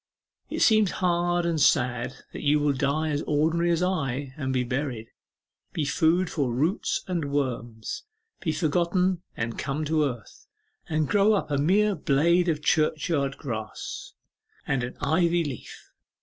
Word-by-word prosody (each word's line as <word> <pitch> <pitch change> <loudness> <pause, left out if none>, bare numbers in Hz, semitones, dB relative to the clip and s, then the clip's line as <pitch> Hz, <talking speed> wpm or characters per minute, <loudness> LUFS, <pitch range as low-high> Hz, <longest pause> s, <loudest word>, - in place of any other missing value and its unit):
It - - -3
seems 215 -3 +5
hard 175 -1 +1
and 165 -3 0
sad 125 -3 +2 0.2
that - - -6
you 150 +1 +3
will 145 -1 +2
die 140 +3 0
as 145 -1 -1
ordinarily 160 +4 +1
as 170 +1 +1
I, 140 -7 -1
and 130 -3 -3
be 130 -1 +1
buried; 125 -3 -3 0.6
be 155 - -1
food 160 +6 +2
for 140 -6 -1
roots 155 - 0
and 165 -6 -2
worms, 120 -5 -3 0.4
be 165 - -1
forgotten 175 +3 +1 0.2
and 115 0 -3
come 145 +3 -2
to 155 0 +2
earth, 120 -5 -7 0.4
and 155 -1 +1
grow 205 +1 +4
up 195 -7 -1
a 140 - +1
mere 200 +8 +3
blade 170 +3 +2
of 150 -2 -1
churchyard 150 -3 +1
grass 110 -6 -6 0.5
and 135 -2 0
an 125 - -6
ivy 170 +4 +2
leaf. 135 -7 -8
150 Hz, 150 wpm, -26 LUFS, 135-170 Hz, 0.6 s, seems